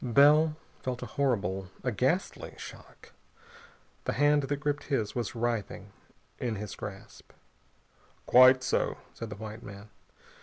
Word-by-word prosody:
Bell 150 +5 +5 0.2
felt 125 -1 -3
a - - -3
horrible, 95 -9 -1
a 125 - 0
ghastly 130 - -1
shock. - - -12 0.9
The - - 0
hand 145 0 +4
that 140 +1 -2
gripped 145 0 -2
his 115 -8 -1
was 120 -3 -3
writhing 115 -2 -2 0.5
in 120 -3 -1
his 105 0 -6
grasp. 100 -1 -9 0.9
"Quite 130 +1 +7
so," - - 0 0.2
said 115 - -7
the 105 - -6
white 110 +2 -8
man. 100 0 -11
125 Hz, 130 wpm, -29 LUFS, 105-140 Hz, 0.9 s, Quite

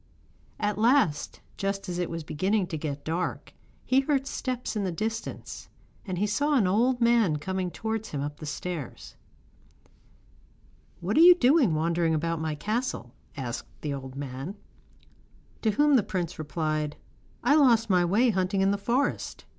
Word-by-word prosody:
At 210 -1 -1
last, 225 - +2 0.2
just 195 0 -2
as 180 -1 -3
it 175 - -1
was 165 -1 -5
beginning 190 +7 0
to 165 - -3
get 145 -2 -5
dark, 170 +3 -3 0.3
he 260 - +4
heard 275 -1 +1
steps 255 -3 -3
in 210 - -1
the 185 - -1
distance 220 +6 -5 0.4
and 185 -2 -3
he 200 - +1
saw 290 +8 +1
an 235 -8 +4
old 240 +7 +2
man 230 -9 +4
coming 185 +4 -3
towards 220 +3 -4
him 145 - -4
up 145 +1 -4
the 155 - -7
stairs. 160 -3 -6 1.9
'What 190 +8 -1
are - - +7
you 355 +1 +10
doing 260 - +4
wandering 165 +1 +1
about 165 +1 -1
my 160 -1 -2
castle?' 210 - -3 0.2
asked 125 -4 -5
the 150 -2 -2
old 135 -1 -7
man. 140 +6 -6 1.1
To 220 - +2
whom 290 +7 +4
the - - +4
prince 180 -4 -4
replied: 155 -1 -2 0.5
'I 270 +5 +4
lost 235 -6 +5
my 180 -3 +3
way 215 +8 +3
hunting 190 0 0
in 195 +1 +3
the 200 - -1
forest. 245 +7 -1
190 Hz, 160 wpm, -27 LUFS, 160-230 Hz, 1.9 s, you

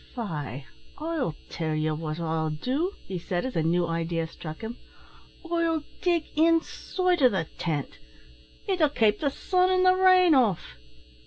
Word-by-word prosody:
"Faix 150 - -5 0.3
I'll 305 - -2
tell 160 -2 -3
ye 155 0 0
what 155 +1 -4
I'll 160 -1 -1
do," 260 - -1
he 185 -2 -4
said, 175 +3 -2
as 260 - -4
a 165 - +2
new 170 +2 +2
idea 165 0 -1
struck 155 -1 -9
him, 225 +2 -6 0.7
"I'll 335 -2 0 0.2
dig 345 -3 +2
inside 335 +2 +1
o' 255 - +7
the 190 -7 -1
tint. 150 -5 -3 0.7
It 380 -2 0
'll 305 - +5
kape 220 -6 +2
the 285 - +1
sun 365 +6 +1
an' 370 0 +3
the 370 0 +6
rain 370 -2 +6
off." 205 - +1
225 Hz, 160 wpm, -27 LUFS, -, 0.7 s, o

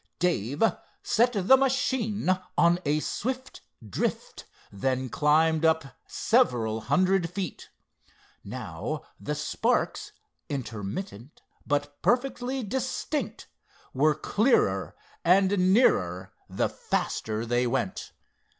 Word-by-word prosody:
Dave 145 - 0 0.4
set 240 +3 +2
the 205 +5 +5
machine 260 -6 0 0.3
on 170 +1 +4
a 150 +1 +2
swift 260 +8 -4 0.3
drift 100 - -3 0.3
then 130 +5 -1
climbed 155 +3 +3
up 160 -5 +1
several 120 - +1
hundred 175 - +2
feet. 180 -2 -5 0.7
Now - - -5 0.2
the - - -3
sparks, - - -1 0.4
intermittent 120 - -6 0.2
but 145 0 -1
perfectly 250 +1 0
distinct, 260 +6 -3 0.5
were 150 +3 +3
clearer 155 - +1 0.3
and 185 +1 +4
nearer 95 - +2 0.2
the - - 0
faster 110 +1 -2
they 120 +1 +1
went. 190 - -2
165 Hz, 95 wpm, -27 LUFS, -, 0.7 s, the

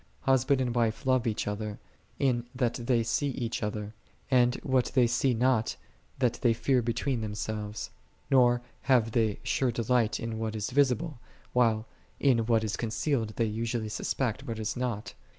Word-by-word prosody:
Husband 135 +1 +3
and 125 -2 0
wife 115 +1 0
love 130 -2 +2
each 110 -2 -1
other, 105 0 -3 0.4
in 120 -3 +1
that 125 -2 +1
they 120 -1 +1
see 130 +5 0
each 120 -4 -3
other: 105 0 -3 0.4
and 125 -1 +4
what 130 -2 +2
they 125 -2 +6
see 120 +2 +2
not, 120 -1 +2 0.4
that 125 -3 +1
they 120 -2 +4
fear 125 +2 +2
between 120 +2 -1
themselves: 105 0 -4 0.4
nor 120 -2 +5 0.3
have 120 -4 +4
they 110 -3 +1
sure 130 -2 +1
de 115 0 -2
light 120 -1 +2
in 115 -1 -4
what 110 -1 -2
is 105 +3 -3
visible, 140 +1 +1 0.3
while 115 -3 +3 0.3
in 120 -5 +3
what 115 -2 +3
is 110 -1 -1
con 115 - -3
cealed 115 -3 -1
they 115 - +1
usually 115 +1 -2
suspect 130 +4 -2
what 115 -2 -3
is 110 -1 -2
not. 115 -3 -3
120 Hz, 170 wpm, -29 LUFS, 110-125 Hz, 0.4 s, they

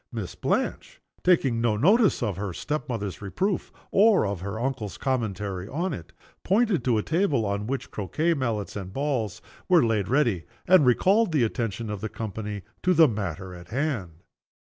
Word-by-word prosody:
Miss 110 -7 -5
Blanche - - -2 0.2
taking 135 -10 +3
no 115 -3 +2
notice 200 - +4
of 105 -5 -1
her 95 0 -4
step 150 - -3
mother's 105 -6 -4
reproof, 185 - -2 0.2
or 205 - +5
of 100 -3 -3
her 100 +3 -4
uncle's 120 -5 -3
commentary 105 -7 -2
on 170 - -2
it 85 - -8 0.3
pointed 200 - +2
to 120 -3 +3
a 105 - 0
table 160 - +1
on 100 +1 -2
which 135 +1 -3
croquet 155 - 0
mallets 115 -9 -2
and 95 -2 -5
balls 135 -7 -2 0.3
were 175 -7 +6
laid 110 -4 +1
ready, 120 - +1 0.2
and 180 -7 +6
recalled 195 - +4
the 150 -6 +3
attention 115 -1 -2
of 105 -2 -5
the 110 - -3
company 105 -2 -5 0.2
to 180 0 +3
the 160 -1 +7
matter 95 - -4
in 90 -1 -10
hand. 110 - -3
115 Hz, 170 wpm, -26 LUFS, 100-155 Hz, 0.3 s, the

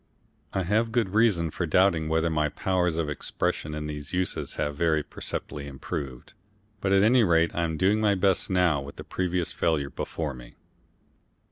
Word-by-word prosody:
I 95 - -1
have 110 +5 +1
good 115 -4 +1
reason 100 -6 +2
for 90 - -2
doubting 80 -2 +3
whether 80 +1 +1
my 75 -1 +1
powers 90 0 0
of 80 -2 0
expression 75 +1 -2
in 75 0 -4
these 75 0 -6
uses 90 0 -2
have 75 0 -2
very 80 -1 +2
perceptibly 70 0 -5
improved, 65 -2 -6 0.5
but 95 - -1
at 95 0 +5
any 120 +3 +5
rate 85 -3 +3
I 85 - -1
am 80 -1 -3
doing 100 +5 +3
my 105 -2 +3
best 95 -1 +1
now 90 -6 +2
with 70 +1 -9
that - - -11
previous 90 -2 -1
failure 75 -4 0
before 80 -4 -4
me. - - -12
85 Hz, 175 wpm, -27 LUFS, 75-95 Hz, 0.5 s, at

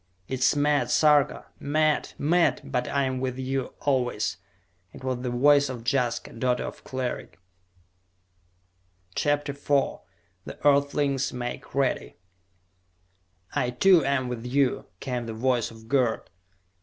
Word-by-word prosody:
"It 130 - -3
is 130 - +3
mad, 145 0 +2
Sarka! 150 -2 +3
Mad! 155 +1 +1
Mad! 170 +4 +2
But 135 -3 -2
I 140 -1 +1
am 130 -1 -1
with 130 -1 -3
you, 130 0 -3
always!" 125 -6 0 0.6
It - - -12
was 130 -1 -2
the 125 - -2
voice 140 +3 +4
of 125 -3 -6
Jaska, 125 -4 0
daughter 125 +1 0
of - - -8
Cleric! 125 -9 -4 1.8
CHAPTER 145 +3 0
IV 140 0 0 0.5
The - - -8
Earthlings 140 -1 +2
Make 120 +1 -6
Ready 135 -2 0 1.4
"I 125 - 0
too, 170 +6 +5
am 135 -2 0
with 120 -2 -5
you!" 130 +1 0
came 125 -3 -3
the 115 - -5
voice 125 0 +1
of 110 0 -14
Gerd. 125 -3 0
130 Hz, 130 wpm, -26 LUFS, 125-145 Hz, 1.8 s, too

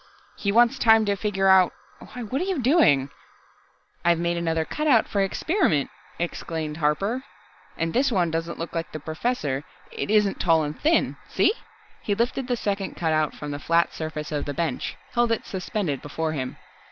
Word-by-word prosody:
He 200 - -1
wants 240 +4 +4
time 220 -1 +5
to 200 -1 +1
figure 195 -1 0
out 190 -1 +6 0.3
why, 245 - -8
what 255 +7 -2
are - - 0
you 380 -5 -1
doing?" 235 - +4 0.9
"I've 170 0 +4
made 170 +1 0
another 165 -1 0
cutout 295 - +2
for 200 - 0
experiment," 195 - +1 0.3
explained 160 -2 -4
Harper. 195 - 0 0.5
"And 165 0 -1
this 265 +2 +2
one 175 -6 +1
doesn't 165 +1 -3
look 165 - -5
like 165 -1 -4
the 155 - -4
Professor, 155 - -2 0.3
isn't 210 -1 +1
tall 165 -3 +3
and 150 0 -5
thin. 320 +2 +2
See - - +3 0.3
?" - - -29
He 205 - -1
lifted 245 +3 -1
the 245 -2 0
second 200 -3 -2
cutout 155 -2 0
from 150 -1 -6
the 145 - -4
flat 170 +3 +2
surface 155 -1 -5
of 150 -1 -2
the 145 - -4
bench, 160 -5 -2 0.2
held 240 -1 +2
it 230 - -1
suspended 185 -6 -3
before 160 +2 -3
him. 130 -4 -4
175 Hz, 175 wpm, -25 LUFS, 155-230 Hz, 0.9 s, out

